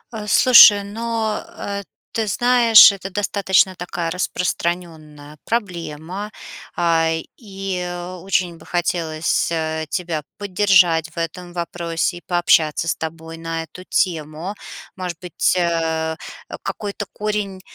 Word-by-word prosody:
Э, 210 -1 -6
слушай, 210 -4 +8
ну, 220 +1 -2
э, 200 0 -6 0.3
ты 220 -2 -2
знаешь, 235 0 +7
это 195 -1 -7
достаточно 190 -1 +2
такая 175 -1 -4
распространенная 160 -5 -4
проблема, 185 -2 -4 0.4
а, 165 -1 +2 0.3
и 195 -4 -5 0.4
очень 180 -3 -1
бы - - -16
хотелось, 165 -2 -1
э, 160 -1 -2
тебя 170 -4 -2 0.2
поддержать 185 -5 +3
в 170 - -23
этом 175 +2 -5
вопросе, 170 0 -2
и - - -11
пообщаться 165 -2 +2
с - - +1
тобой 160 0 -7
на 165 0 -4
эту 180 +3 -12
тему. 165 +1 -2 0.4
Может 180 -3 -5
быть, 180 +1 0
э-э, 160 -2 0 0.3
э, - - -6
какой-то 205 -1 -5
корень 210 -3 -3
175 Hz, 120 wpm, -20 LUFS, 165-200 Hz, 0.4 s, слушай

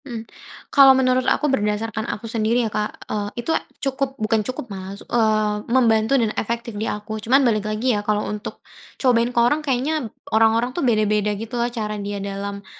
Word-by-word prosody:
Mmm, 230 -4 -6 0.5
kalau 270 -1 +8
menurut 255 -1 +3
aku - - +1
berdasarkan 220 -3 -1
aku 215 - -5
sendiri 230 +1 +1
ya, 215 - -4
Kak, 210 0 -3
eee, 205 -1 -3 0.2
itu 325 - +1 0.3
cukup 270 0 -2
bukan 220 -1 +1
cukup 255 +4 -5
malah, 190 +1 -7 0.7
membantu 230 0 +3
dan 225 -4 +1
efektif 235 +1 -3
di 210 +2 -3
aku 215 +1 -5
cuman 260 +6 +4
balik 215 -3 +1
lagi 225 +4 +1
ya, 205 - 0
kalau 210 0 0
untuk 210 0 -6 0.3
cobain 240 -2 +3
ke 245 - -10
orang 245 +6 +3
kayaknya 275 -1 -1 0.2
orang-orang 225 +3 +3
tuh 350 - -3
beda-beda, 210 -4 +1
gitu 225 +3 -8
loh, 240 0 0
cara 210 -3 -4
dia 200 0 -4
dalam, 200 0 -5
225 Hz, 180 wpm, -22 LUFS, 210-250 Hz, 0.7 s, kalau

